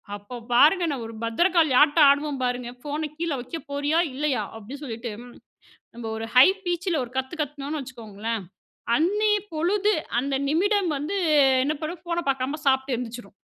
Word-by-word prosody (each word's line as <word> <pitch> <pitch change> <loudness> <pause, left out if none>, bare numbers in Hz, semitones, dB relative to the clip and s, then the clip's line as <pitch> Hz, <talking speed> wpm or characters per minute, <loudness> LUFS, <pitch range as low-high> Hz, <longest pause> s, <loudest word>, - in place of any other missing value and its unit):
அப்போ 205 +5 -10 0.2
பாருங்க. 315 +9 +5
நான் 260 -5 -4
ஒரு 225 - -9
பத்ரகாளி 325 +5 +2
ஆட்டம் 295 0 +6
ஆடுவேன். 285 -1 +1
பாருங்க, 245 -1 -2
ஃபோன 300 +1 -3
கீழ 335 -1 -2
வைக்க 260 +7 -6
போறியா? 290 +3 +1 0.2
இல்லயா? 275 -5 0
அப்பிடின்னு 245 +7 -9
சொல்லிட்டு, 230 -1 -5 0.8
நம்ம 240 - -8
ஒரு 225 - -4
ஹை 255 - +9 0.2
பீச் 355 +2 -1
ல - - +1
ஒரு 235 - -15
கத்து 265 +5 -2
கத்துனோனு 295 +1 -4
வச்சுக்கோங்களேன், 225 -4 -5 0.5
அன்னய 420 +6 +2 0.2
பொழுது 400 +6 +1 0.3
அந்த 275 +1 -2
நிமிடம் 380 +3 +2
வந்து, 315 +8 -3 0.5
என்ன 300 +3 0
பண்ணும்? 325 +2 -5
ஃபோன 340 0 -2
பாக்காம 270 +3 -2
சாப்பிட்டு 265 -1 +2
எந்திரிச்சுரும். 235 -3 -7
285 Hz, 155 wpm, -25 LUFS, 245-330 Hz, 0.8 s, ஹை